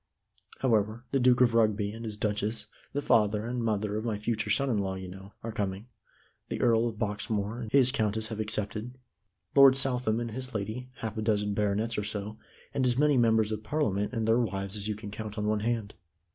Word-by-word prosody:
However, 115 -1 +1
the 135 - +2
Duke 125 0 +4
of 120 -2 +5
Rugby 105 -3 +2
and 115 +2 -7
his 105 -2 -5
Duchess, 105 +1 -1 0.3
the 145 - -2
father 105 -2 +3
and 120 0 -2
mother 105 -1 0
of 110 - -3
my 115 -3 -1
future 110 +1 -2
son 140 - +2
in 115 -6 +1
law, 95 -1 -1
you 95 0 -6
know, 95 +2 -11
are 115 - -3
coming; 100 +1 -3 0.6
the - - -3
Earl 115 -1 +3
of 115 - -4
Boxmoor 105 0 -2
and 110 -2 -6
his 130 -2 +5
countess 110 -3 0
have 110 -1 -5
accepted; 110 +3 -3 0.6
Lord 135 -1 +8
Southam 125 -4 +1
and 120 -1 -3
his 130 +1 -5
lady, 110 +5 -4
half 110 -1 -4
a - - -1
dozen 105 -2 +1
baronets 105 +2 0
or - - -2
so, 105 +1 -4 0.3
and 135 - 0
as 120 0 +1
many 145 0 +4
Members 110 -3 +3
of 110 -1 -3
Parliament 105 -8 0
and 115 -3 -1
their 115 +2 +4
wives 100 -3 -2
as 105 0 -3
you 105 - -1
can 105 -1 -8
count 110 0 -6
on 105 - -1
one 105 0 +1
hand. 110 -1 -2
110 Hz, 215 wpm, -29 LUFS, 105-120 Hz, 0.6 s, Lord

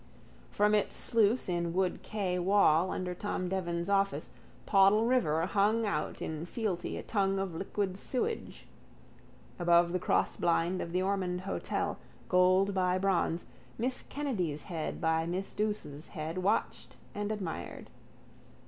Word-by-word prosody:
From 210 +1 +2
its 210 -1 +1
sluice 230 +1 +2
in 170 -2 -1
Wood 185 0 0
quay 190 -4 -2
wall 185 -2 +4
under 180 -1 -3
Tom 185 -1 -3
Devan's 175 -2 -2
office 195 0 +1 0.3
Poddle 200 +2 +5
river 170 -11 +2
hung 210 +4 +2
out 155 -7 -2
in 160 +2 -4
fealty 200 -4 -3
a - - -6
tongue 195 -2 +1
of 195 -2 -2
liquid 190 +2 -2
sewage. 435 - -3 0.9
Above 170 0 +4
the 185 - +1
crossblind 170 +1 +1
of 170 - -5
the 180 +1 +1
Ormond 185 -2 -1
hotel, 195 - -2 0.3
gold 185 +2 +4
by 185 -1 +2
bronze, 185 -3 0 0.3
Miss 250 +3 -1
Kennedy's 185 - -3
head 165 -4 -4
by 160 0 +1
Miss 185 +3 -3
Douce's 205 -8 -3
head 160 +1 -5
watched 195 +4 -1 0.2
and 205 +1 -3
admired. 195 -6 -5
185 Hz, 135 wpm, -31 LUFS, 170-205 Hz, 0.9 s, Poddle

